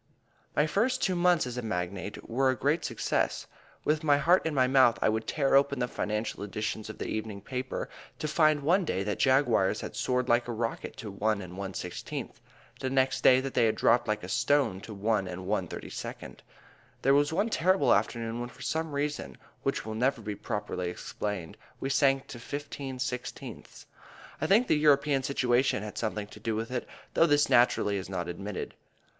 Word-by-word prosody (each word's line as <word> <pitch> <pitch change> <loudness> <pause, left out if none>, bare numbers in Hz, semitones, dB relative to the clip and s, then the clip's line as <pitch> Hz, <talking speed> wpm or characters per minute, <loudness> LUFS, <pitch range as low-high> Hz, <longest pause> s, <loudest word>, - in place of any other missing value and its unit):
My 150 - +4
first 230 +11 +1
two 185 - +2
months 175 -3 +3
as 125 -1 -5
a - - -1
magnate 95 -2 -4
were 130 +3 +2
a 130 - +2
great 150 +6 +1
success. 115 -6 -1 0.4
With 155 +1 +1
my 145 -2 +4
heart 165 +4 +3
in 155 - -2
my 130 -1 +4
mouth 130 -2 +5
I - - +3
would 110 +1 -1
tear 140 -3 +1
open 140 0 +4
the 125 0 0
financial 105 -2 -3
editions 105 +1 -4
of 110 - -7
the - - -4
evening 110 -2 -4
papers, 130 +5 -4 0.3
to 155 - -3
find 155 -1 +3
one 180 +6 +3
day 95 - -1
that 105 0 -2
Jaguars 130 -7 +3
had - - -7
soared 125 0 0
like 120 0 +3
a - - -2
rocket 115 0 -3
to 110 -5 -6
1 105 +2 0
1/16, 95 -1 -5 0.5
the 130 - -2
next 135 0 +1
that 130 +1 +4
they 120 - +4
had 110 - +1
dropped 120 +1 +3
like 105 -2 -1
a - - -5
stone 120 -2 +1
to 110 - -9
1 100 -1 0
1/32. 90 0 -5 0.7
There 135 - +5
was 145 +1 +3
one 205 +8 +1
terrible 185 -1 +3
afternoon 115 0 -1
when 120 0 -4
for 135 - -12
some 160 +4 -2
reason 145 +1 -3 0.2
which - - -1
will 110 - -4
never 125 +2 +1
be 105 0 -3
properly 100 -4 -3
explained 95 -1 -5 0.2
we 135 - -2
sank 135 -1 +3
to 120 - -8
15/16. 130 -2 -6 0.6
I 155 - +1
think 215 +7 +5
the 155 - +3
European 145 -2 +3
situation 125 -4 +1
had 105 - -6
something 105 -2 -2
to 105 - -13
do 110 +1 -2
with 115 +2 -3
it, 125 -1 -3 0.3
though 165 - +5
this 145 -1 +3
naturally 110 -4 +4
is 95 - -6
not 90 -3 -3
admitted. 95 +3 -5
125 Hz, 185 wpm, -29 LUFS, 105-145 Hz, 0.7 s, mouth